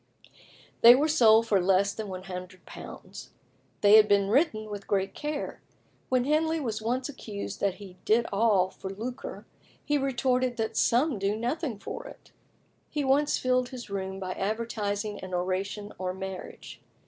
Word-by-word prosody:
They 235 +1 +10
were 290 +4 +2
sold 230 -7 +5
for 205 -4 +2
less 195 +2 +3
than 220 -1 -5
£100. 185 -1 -9 0.5
They 205 +1 +8
had 215 -1 +6
been 200 -1 +3
written 225 -4 +2
with 205 -1 -7
great 195 -1 0
care. 295 -1 -4 0.5
When 255 -1 +2
Henley 320 +3 +1
was 225 -7 -3
once 250 +4 -1
accused 220 -8 -7
that 200 -2 0
he 190 -3 -12
did 230 +2 +3
all 200 -3 +3
for 190 - -8
lucre, 230 +6 -6 0.4
he 295 0 +1
retorted 255 -2 0
"that 225 -1 -2
some 250 0 +2
do 200 +2 0
nothing 245 +2 -2
for 485 - -7
it." - - -14 0.6
He 295 - -2
once 275 +2 +2
filled 255 -1 +1
his 245 -5 -9
room 190 -1 -4
by 185 -1 -4
advertising 210 0 -2
an 185 -1 -5
oration 195 +3 -3
on 185 0 -3
marriage. 190 -1 -8
215 Hz, 155 wpm, -28 LUFS, 195-255 Hz, 0.6 s, They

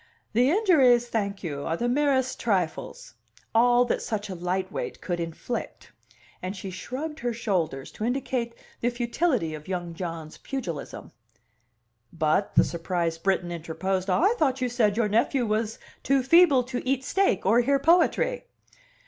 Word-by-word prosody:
"The 245 +4 +4
injuries, 280 - +4
thank 200 -3 -2
you, 145 -5 -4
are 165 - -2
the 240 - -1
merest 260 -1 +1
trifles 200 - -2 0.4
all 245 +2 +5
that - - -1
such 210 -2 -3
a - - -4
light 185 +2 -2
weight - - -5
could 175 -1 -3
inflict." 170 +8 -5 0.5
And 185 +2 -4
she 190 0 -6
shrugged 295 - -6
her 240 -1 -2
shoulders 180 - -2
to - - -7
indicate 245 -1 -2 0.2
the 240 - +1
futility 240 - 0
of 155 -1 -9
young 175 -2 -4
John's 165 -2 -6
pugilism. 190 - -6 1.0
"But," 160 +4 0
the - - +7
surprised 170 -1 -2
Briton 185 -2 0
interposed, 185 +3 -3
"I 355 - +3
thought 270 -4 +2
you 250 -1 0
said 220 -4 +1
your 230 -2 +2
nephew 235 +4 +1
was 215 0 -1 0.2
too 275 -1 +2
feeble 310 -3 +6
to 250 0 -4
eat 265 0 0
steak 385 - +1
or 220 +5 +5
hear 275 +3 +3
poetry." 355 - +2
230 Hz, 155 wpm, -26 LUFS, 180-260 Hz, 1.0 s, the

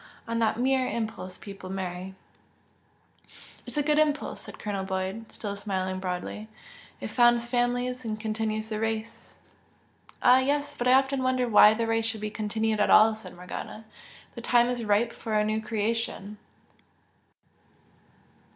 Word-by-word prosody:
On 230 0 -1
that 220 -1 +1
mere 260 0 +2
impulse 215 -5 -4
people 195 -2 -9
marry." 190 0 -5 1.5
"It's - - -6
a 295 - +2
good 300 +1 +3
impulse" 295 -1 0
said - - -10
Colonel 200 -2 -3
Boyd, 190 +3 -4
still 205 -2 -5
smiling 190 -2 -3
broadly 185 +3 -4 0.5
"It - - -5
founds 240 -1 +4
families 245 +1 0
and 215 -2 -4
continues 220 0 -2
the 215 -1 -3
race!" 225 0 -4 0.9
"Ah, 255 +1 +7
yes! 285 +2 0
But 245 - -1
I 250 - +6
often 270 0 +3
wonder 255 -1 +1
why 210 -1 +7
the 230 +1 0
race 225 0 +1
should 225 -1 -1
be 215 0 -3
continued 220 0 -1
at 210 - +3
all!" 220 +1 +7
said 220 -3 -10
Morgana 180 +4 -7 0.5
"The 235 - -8
time 240 0 +3
is 245 -2 -2
ripe 210 +3 +2
for 220 -1 -4
a 210 0 +3
new 215 +1 0
creation!" 215 -1 -2
220 Hz, 150 wpm, -27 LUFS, 210-245 Hz, 1.5 s, Ah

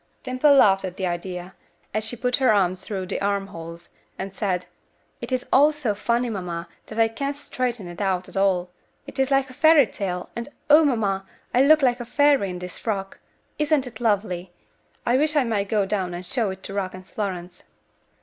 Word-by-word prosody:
Dimple 255 +3 +4
laughed 195 -7 +5
at 185 -1 -5
the 190 - -1
idea, 180 +1 -4 0.4
as 215 +1 0
she 220 +3 -4
put 250 +1 0
her 260 -4 +4
arms 185 -3 +2
through 190 -3 -4
the 185 - -3
arm 200 0 0
holes, 170 -2 -9 0.3
and 195 0 -5
said, 185 -3 -1 0.6
"It - - -6
is 255 -1 0
all 290 +3 +7
so 295 -8 -1
funny, 235 +4 0
mamma, 180 -6 -4 0.2
that 215 - -9
I 225 0 +5
can't 275 +5 -3
straighten 245 -7 -3
it 175 +3 -7
out 185 -2 0
at - - -14
all. 185 -2 +1 0.3
It - - -9
is 265 0 +2
like 270 -1 +2
a - - -12
fairy 315 0 +6
tale, 180 -5 -4
and, 235 +2 -4 0.2
O! 310 +2 +8
mamma, 205 -8 0 0.3
I 250 - +5
look 305 +2 +6
like 245 -1 +3
a 240 - -5
fairy 280 -4 +3
in 180 - -5
this 180 0 -8
frock. 195 -3 -3 0.4
Isn't 300 -3 +2
it 235 -3 -9
lovely? 195 -5 0 0.5
I 245 +2 +3
wish 305 +2 +1
I 290 - +4
might 205 -5 -1
go 210 -3 +2
down 190 -3 -2
and 180 +1 -6
show 230 -1 0
it 190 0 -7
to 195 - -4
Rock 190 -2 -2
and 185 0 -11
Florence." 185 -3 -5
205 Hz, 205 wpm, -24 LUFS, 185-255 Hz, 0.6 s, O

